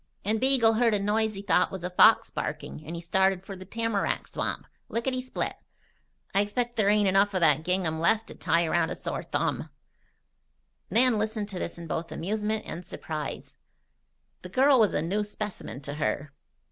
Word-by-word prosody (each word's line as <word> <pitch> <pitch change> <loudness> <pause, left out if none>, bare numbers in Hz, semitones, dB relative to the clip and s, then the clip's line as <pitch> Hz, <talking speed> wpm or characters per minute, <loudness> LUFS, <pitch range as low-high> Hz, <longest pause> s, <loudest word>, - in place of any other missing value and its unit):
And 215 +2 +1
Beagle 260 -4 +4
heard 230 -3 +4
a - - +1
noise 215 +1 +1
he 195 - -6
thought 180 -2 +3
was 190 -2 -6
a 180 - -3
fox 220 +5 +5
barking 155 - -5
and 165 - -5
he 170 - -5
started 190 +2 +1
for 195 - -7
the 185 0 -10
tamarack 225 0 -1
swamp, - - -3 0.2
lickety 255 +2 -1
split. 255 - -3 0.8
I 195 - +4
expect 240 +4 -2
there 205 -2 +3
ain't 210 -1 +4
enough 195 +1 +3
of 185 - +1
that 155 -3 +4
gingham 175 -2 0
left 225 +7 +2
to - - -8
tie 170 0 +1
around 165 0 +1
a - - -3
sore - - -4
thumb." - - -2 1.2
Nan 240 -1 +4
listened 215 -1 -2
to 190 -3 -5
this 170 - -4
in 170 - -8
both 165 +1 -4
amusement 215 +4 -2
and 175 - -6
surprise. 155 -3 -6 0.8
The 180 - -9
girl 265 +6 +4
was 215 -3 +3
a 150 - +1
new 200 +6 0
specimen 205 - -6
to 145 +1 -5
her. 150 -1 -2
200 Hz, 185 wpm, -27 LUFS, 170-220 Hz, 1.2 s, fox